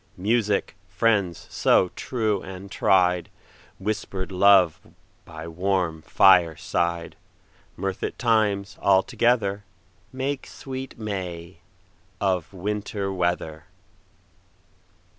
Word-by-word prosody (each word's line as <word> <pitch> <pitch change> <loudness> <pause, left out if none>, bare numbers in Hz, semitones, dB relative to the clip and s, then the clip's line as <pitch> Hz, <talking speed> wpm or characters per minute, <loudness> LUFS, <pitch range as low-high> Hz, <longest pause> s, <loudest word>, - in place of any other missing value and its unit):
Music, 105 +1 0
friends 100 -7 +1
so 90 - +3
true 110 -4 -2
and 95 +1 -9
tried, 90 -3 +2 0.5
Whisper'd 95 -2 -4
love 95 -3 +5 0.5
by 80 0 -9
warm 90 -1 -1
fireside, 85 -1 +2 0.6
Mirth 95 -1 -4
at - - -2
all - - -36
times 105 -4 +1
all 95 -1 +4
together, 105 -3 +1 0.5
Make 130 +1 -3
sweet 130 0 -7
May 90 -5 -5 0.6
of 95 -4 0
Winter 100 +1 -3
weather. 85 -3 -2
95 Hz, 90 wpm, -24 LUFS, 90-105 Hz, 0.6 s, love